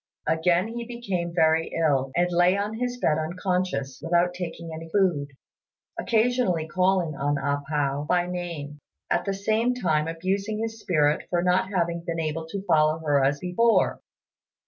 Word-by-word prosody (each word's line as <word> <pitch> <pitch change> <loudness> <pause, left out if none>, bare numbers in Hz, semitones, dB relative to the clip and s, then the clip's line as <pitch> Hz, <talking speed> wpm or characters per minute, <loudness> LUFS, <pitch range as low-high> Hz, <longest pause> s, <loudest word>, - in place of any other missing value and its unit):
Again 170 +5 +2
he 235 +1 -5
became 195 -8 -3
very 165 -1 +3
ill, 135 -4 +2
and 175 +1 +2
lay 175 +2 +4
on 210 +2 -3
his 245 0 -2
bed 160 -10 +1
unconscious, 170 -5 -2
without 175 +1 +2
taking 170 -2 -6
any 165 +1 -8
food, 175 -6 +1 0.7
occasionally 225 -8 +1
calling 180 -1 +1
on 145 +1 -1
A 140 +1 -1
pao 145 -2 0
by 175 -1 +3
name, 170 -5 -5 0.3
at - - +1
the 195 - -1
same 220 +5 +1
time 160 -9 +1
abusing 195 +6 -2
his 225 0 -4
spirit 150 -7 +1
for 175 0 +1
not 185 +1 +2
having 170 -3 -1
been 170 -1 -3
able 160 0 -3
to 195 +4 -5
follow 155 -2 +3
her 145 -2 +3
as 140 +2 +2
before. 205 +7 +2
175 Hz, 160 wpm, -25 LUFS, 155-195 Hz, 0.7 s, lay